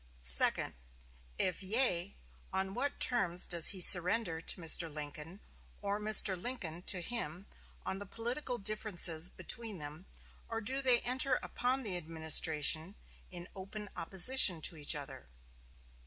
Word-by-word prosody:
"Second. - - +5 0.6
If 185 0 -3
yea, 195 -3 -1 0.4
on 190 0 -3
what 275 +6 -5
terms 185 -8 0
does 170 -2 +2
he 190 - +6
surrender 180 -1 +4
to 170 - -2
Mr. 165 0 +2
Lincoln, 150 +5 -9 0.4
or 200 +1 -5
Mr. 210 -2 +6
Lincoln 180 -5 -7
to 185 -3 +2
him, 180 -4 -4 0.4
on 190 - -5
the 205 - -11
political 245 +4 -6
differences 195 -6 -1
between 225 -1 -5
them, 150 +4 -8 0.4
or 225 - -5
do 260 +5 -1
they 250 -3 +3
enter 255 +1 +1
upon 255 +2 -3
the 195 -5 -2
administration 160 +1 0 0.3
in 175 -1 -10
open 200 +2 -10
opposition 190 0 +3
to 165 - 0
each 150 0 -2
other?" 140 - -11
190 Hz, 135 wpm, -31 LUFS, 165-225 Hz, 0.6 s, he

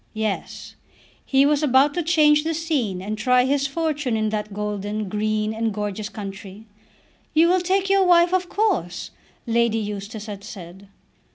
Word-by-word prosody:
Yes, 215 -2 -4 0.5
he 270 0 +4
was 295 0 +2
about 280 0 +4
to 350 - -1
change 305 -2 +4
the 325 0 -1
scene 265 - -2
and 210 +2 -3
try 250 +2 +3
his 275 +1 +1
fortune 295 -5 -1
in 215 0 0
that 210 0 -3
golden, 210 +1 -3
green, 215 +2 -1
and 225 0 -1
gorgeous 210 0 -4
country. 200 0 -9 0.7
"You 325 +2 +6
will 365 +1 +3
take 380 +2 +1
your 390 0 +4
wife 350 0 +5
of 365 -1 0
course," 375 - -1 0.3
Lady 235 -1 +1
Eustace 210 0 -5
had 205 -2 -8
said. 190 -2 -10
225 Hz, 160 wpm, -22 LUFS, 210-305 Hz, 0.7 s, You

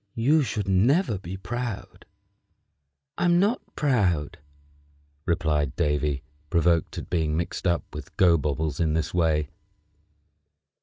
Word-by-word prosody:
You 145 +7 +3
should 105 -6 -2
never 110 - +3
be 95 0 -7
proud." 115 +3 -5 1.1
"I'm 175 0 +4
not 210 +6 +2
proud," 95 - +1 0.9
replied 80 -6 0
Davy, 75 -2 0 0.3
provoked 85 0 +2
at - - -6
being 80 -2 0
mixed 85 +2 -2
up 85 -1 +1
with - - -9
Gobobbles 80 -3 +2
in 80 -3 +1
this 80 - -1
way. 80 -4 +1
85 Hz, 110 wpm, -26 LUFS, 75-115 Hz, 1.1 s, I'm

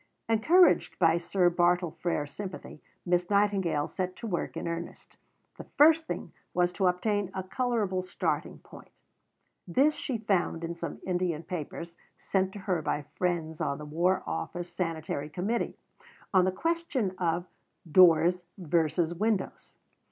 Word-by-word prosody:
Encouraged 300 +12 +4
by 165 -1 +4
Sir 180 +1 +2
Bartle 175 0 +2
Frere's 165 -3 -2
sympathy, 185 -4 -8 0.2
Miss 175 0 +1
Nightingale 200 -7 +2
set 185 -1 -4
to 235 - -8
work 180 -6 -3
in - - -4
earnest. 170 0 -6 0.4
The - - -9
first 320 +2 +6
thing - - -5 0.2
was 175 0 +3
to 190 0 +1
obtain 200 +2 0
a 190 - -2
colourable 210 -3 -1
starting 185 - -2
point. - - -15 0.8
This 275 - +3
she 260 -5 -3
found 190 -6 0
in 165 0 -3
some 170 0 -6
Indian 175 -3 -1
papers, 170 -1 -6 0.2
sent 190 -1 0
to 205 - -7
her 185 -4 -1
by 150 -1 -2
friends 165 -3 -2
on 140 -3 -1
the 150 - -8
War 175 +5 +1
Office 175 - -4
Sanitary 160 -4 -3
Committee, 195 +9 -2 0.6
on 185 -1 +5
the 185 - +2
question 300 - -1
of 170 0 0 0.5
"Doors 180 0 +6 0.2
versus 170 -1 +1
Windows." 210 +2 -2
180 Hz, 145 wpm, -29 LUFS, 170-200 Hz, 0.8 s, first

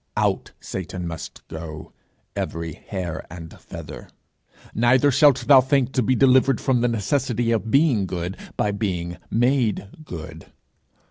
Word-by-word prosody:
Out - - 0
Satan 95 -1 -5
must 80 -1 -7
go, 80 -1 -8 0.4
every 85 -1 -3
hair 85 -2 -5
and 80 -1 -9
feather! - - -9 0.6
Neither 125 +5 +4
shalt 135 -2 +4
thou 135 -2 +8
think 130 -1 +1
to 130 - +1
be 130 +3 +2
delivered 130 -1 +4
from 130 -3 +1
the 120 - +3
necessity 120 +1 0
of 115 -1 0
being 135 - +3
good 90 +1 -4 0.2
by 105 - +1
being 90 -4 -3
made 120 -4 +1
good. 80 - -9
110 Hz, 135 wpm, -23 LUFS, 85-130 Hz, 0.6 s, thou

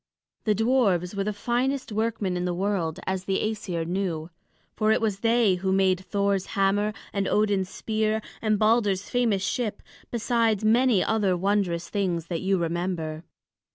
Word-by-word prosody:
The 210 -1 +3
dwarfs 210 -6 +2
were 200 -1 -1
the 210 - 0
finest 250 +5 -1
workmen 215 -3 -1
in 180 0 -1
the 175 -1 -1
world, 185 -4 -1
as 190 0 -2
the 195 - 0
Æsir 195 -6 -2
knew; 175 -2 -2 0.4
for 215 -1 +2
it - - +3
was 210 -3 -1
they 230 -2 +3
who 190 0 0
made 190 -1 +3
Thor's 200 0 -1
hammer, 200 +2 +2 0.2
and 200 -1 0
Odin's 205 -3 +1
spear, 220 +1 -1 0.2
and 215 -2 +2
Balder's 210 -3 +2
famous 230 -6 +1
ship, 230 -1 -2 0.3
besides 230 -3 +1
many 230 -2 +4
other 205 -5 +1
wondrous 185 -3 0
things 175 -5 -2
that 170 -2 -2
you 195 0 +1
remember. 170 -2 -2
200 Hz, 155 wpm, -26 LUFS, 185-220 Hz, 0.4 s, many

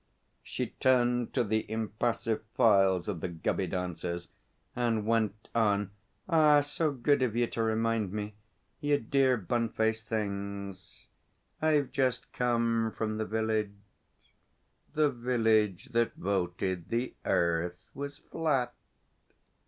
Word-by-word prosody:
She - - -4
turned 125 -2 +3
to 125 - +3
the 110 0 -1
impassive 110 +1 -1
files 95 -5 +4
of 95 -6 -3
the - - -1
Gubby 85 -2 -1
dancers, 85 -1 -4 0.5
and 115 -3 0
went 110 -2 0
on: 105 -3 +2 0.4
'Ah, 155 -4 +6
so 150 +2 -1
good 140 +1 +2
of 120 -4 +1
you 120 0 +3
to 115 - -3
remind 110 -2 +1
me, 105 0 -4 0.5
you 145 0 +2
dear, 130 +1 +2
bun 115 +3 -1
faced 110 0 -1
things. 100 -2 -4 0.6
I've 150 -3 +2
just 130 -1 -1
come 115 -2 +1
from 110 -1 -2
the 110 - 0
village 110 -2 -1 1.2
The 150 -1 +3
Village 110 -6 +1
that 115 -1 +1
Voted 90 -2 -2
the 120 +2 -1
Earth 85 +1 0
was 140 +1 -6
Flat.' 135 -8 -1
110 Hz, 120 wpm, -30 LUFS, 100-125 Hz, 1.2 s, Ah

